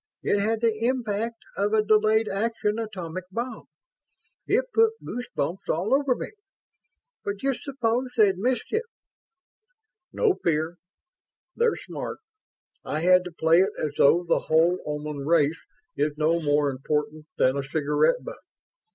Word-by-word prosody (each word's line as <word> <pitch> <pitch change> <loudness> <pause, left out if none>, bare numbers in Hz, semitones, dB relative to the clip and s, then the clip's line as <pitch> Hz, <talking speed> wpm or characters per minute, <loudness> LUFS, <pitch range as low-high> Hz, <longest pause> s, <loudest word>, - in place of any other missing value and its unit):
It 205 - +2
had 220 +2 0
the 225 -1 +1
impact 230 -2 -2
of 205 +2 0
a 215 -1 +4
delayed 215 +1 +3
action 210 +1 -1
atomic 185 -5 -5
bomb. 240 +5 -5 0.8
It - - +2
put 450 0 +4
goose 245 +1 -5
bumps 170 +7 -3
all 180 +9 0
over 275 -2 +3
me. - - -6 0.9
But 200 0 -3
just 270 +4 -1
s'pose 255 -2 -1
they'd 205 -4 +5
missed 245 +2 0
it?" 450 +2 0 1.3
"No 440 -5 +2
fear. 160 +1 0 0.8
They're 470 -1 +2
smart. - - -6 0.7
I 150 - -3
had 180 +1 +5
to 180 - -6
play 165 +1 +3
it 190 - +2
as 150 -2 -2
though 170 +5 +5
the 170 - +2
whole 165 +3 +3
Oman 150 -1 -4
race 160 0 +2 0.3
is 150 0 -1
no 160 +2 +2
more 145 -1 +2
important 150 +3 -3
than 130 +1 +3
a 140 - -1
cigarette 150 - +1
butt. - - -8
195 Hz, 145 wpm, -25 LUFS, 155-230 Hz, 1.3 s, they'd